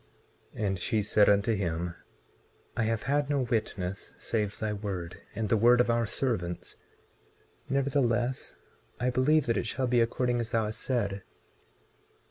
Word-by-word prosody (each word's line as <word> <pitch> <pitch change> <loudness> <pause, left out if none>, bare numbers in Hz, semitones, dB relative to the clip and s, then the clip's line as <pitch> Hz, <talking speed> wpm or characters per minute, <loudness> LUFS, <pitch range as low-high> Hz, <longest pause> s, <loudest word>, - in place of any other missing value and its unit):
And 95 -3 -1
she 105 +4 0
said 105 0 +4
unto 100 +3 +3
him: 85 -3 -2 0.8
I 120 - +1
have 115 0 -1
had 145 +1 +1
no 145 -2 +2
witness 105 -6 -2
save 105 -3 -1
thy 110 -1 -2
word, 95 -5 -5
and 110 +1 -1
the 110 - +3
word 120 +3 +5
of 125 -1 +4
our 115 -1 +1
servants; 95 -10 -2 0.9
nevertheless 130 -2 0 0.4
I 125 +1 +1
believe 140 +4 +3
that 115 -2 +1
it 115 - -1
shall 130 +4 -1
be 120 -1 +3
according 120 +1 +1
as 115 -1 -2
thou 115 -1 +2
hast 105 0 -5
said. 100 -6 -1
115 Hz, 150 wpm, -29 LUFS, 100-125 Hz, 0.9 s, word